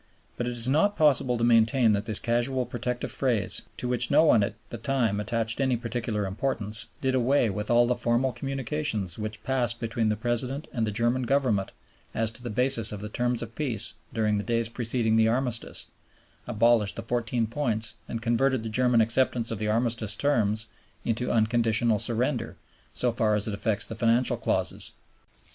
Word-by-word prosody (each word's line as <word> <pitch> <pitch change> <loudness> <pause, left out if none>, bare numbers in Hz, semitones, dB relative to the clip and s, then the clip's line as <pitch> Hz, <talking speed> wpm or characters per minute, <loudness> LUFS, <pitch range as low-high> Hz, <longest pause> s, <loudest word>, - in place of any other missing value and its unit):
But 120 - -3
it 125 - -2
is 120 0 -3
not 160 +10 +2
possible 135 -6 +3
to 115 - -2
maintain 115 +1 +4
that 100 +1 -2
this 110 -2 +4
casual 120 +2 0
protective 125 +1 -3
phrase, 120 -6 0 0.2
to 125 - -4
which 125 -1 +2
no 150 +3 +5
one 135 -9 +5
at 100 +1 -2 0.2
the 120 - -6
time 115 -4 0
attached 115 +3 -1
any 130 -2 +1
particular 115 -3 -3
importance, 110 +1 0
did 130 -1 0
away 125 -2 +2
with 105 +2 -5
all 120 0 +5
the 125 - +1
formal 120 +2 0
communications 135 - -3
which 110 0 -6
passed 120 -3 0
between 115 -1 -1
the 105 - +1
President 125 +5 -2
and 115 -3 -1
the - - -1
German 120 +4 0
Government 120 -6 0 0.4
as 110 0 +1
to 120 - -6
the 120 - -5
basis 125 +1 +2
of 105 - -6
the 105 - -6
Terms 120 +1 -1
of 115 0 -9
Peace 115 -7 -1 0.2
during 105 -2 0
the - - -3
days 115 -1 0
preceding 115 -1 0
the 110 0 +4
Armistice, 120 0 0 0.6
abolished 110 -2 +2
the - - -6
Fourteen 120 -1 -1
Points, 115 -2 -1 0.2
and 115 0 -5
converted 125 +1 +1
the 110 - -4
German 125 +1 +3
acceptance 115 0 +2
of 110 - -4
the 105 - -2
Armistice 115 -1 0
Terms 110 -6 +1 0.4
into 120 +2 -1
unconditional 115 -1 +2
surrender, 120 - -1 0.3
so 125 - +1
far 110 -2 +1
as 105 +1 +1
it 105 - -3
affects 105 +1 0
the - - -5
Financial 115 +2 +2
Clauses. - - -1
115 Hz, 185 wpm, -26 LUFS, 110-125 Hz, 0.6 s, no